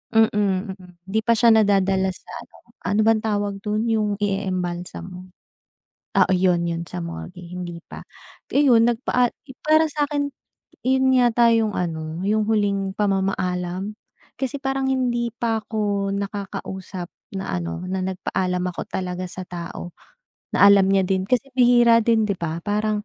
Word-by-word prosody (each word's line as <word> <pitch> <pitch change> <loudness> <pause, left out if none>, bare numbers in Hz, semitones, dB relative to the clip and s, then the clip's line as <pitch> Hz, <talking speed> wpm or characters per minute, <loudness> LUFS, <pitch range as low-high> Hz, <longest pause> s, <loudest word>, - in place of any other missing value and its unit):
mm, 225 0 +6
mm, 200 -2 +1 0.5
hindi 195 +3 -1
pa 230 +1 +2
siya 235 +1 +5
nadadala 195 -3 +3
sa - - -16 0.2
ano, - - -24 0.3
ano 205 +3 +1
bang 220 -1 +3
tawag 205 -1 0
dun, 210 +2 -1
yung 215 -2 +1
ieembalsamo? 185 -2 -3 1.0
Oo, - - +2
'yon, 180 -2 +3
'yon, 170 0 -4
sa 90 - -6
morgue, 85 - -7
hindi 175 -1 -7
pa. - - -9 0.5
Iyon 245 -5 +5
nagpaa 240 +1 +1
yun 265 -2 -13
para 310 +1 +5
sa 295 0 0
akin, 285 -1 -2 0.5
iyon 260 0 +3
yata 240 -1 +4
yung 220 -2 +2
ano, 160 -2 -3
yung 215 +1 +2
huling 200 -2 0
pamamaalam. 190 -1 -1 0.4
Kasi 270 +1 -3
parang 270 0 -1
hindi 240 -3 0
pa 230 -2 0
ko 205 -3 -1
nakakausap 195 -2 -5 0.2
na 190 - -3
ano, 85 - -5
na 190 - -1
nagpaalam 180 -1 -2
ako 170 - -5
talaga 180 0 -4
sa 185 +1 -7
tao, 175 0 -7 0.6
na 200 - +5
alam 195 -1 +6
niya 195 -1 +3
din. 190 0 +1
Kasi 250 +1 +1
bihira 240 -2 +5
din, 225 -1 +3
'di 200 - 0
ba, 165 -2 -4
parang 210 0 0
200 Hz, 150 wpm, -23 LUFS, 185-230 Hz, 1.0 s, mm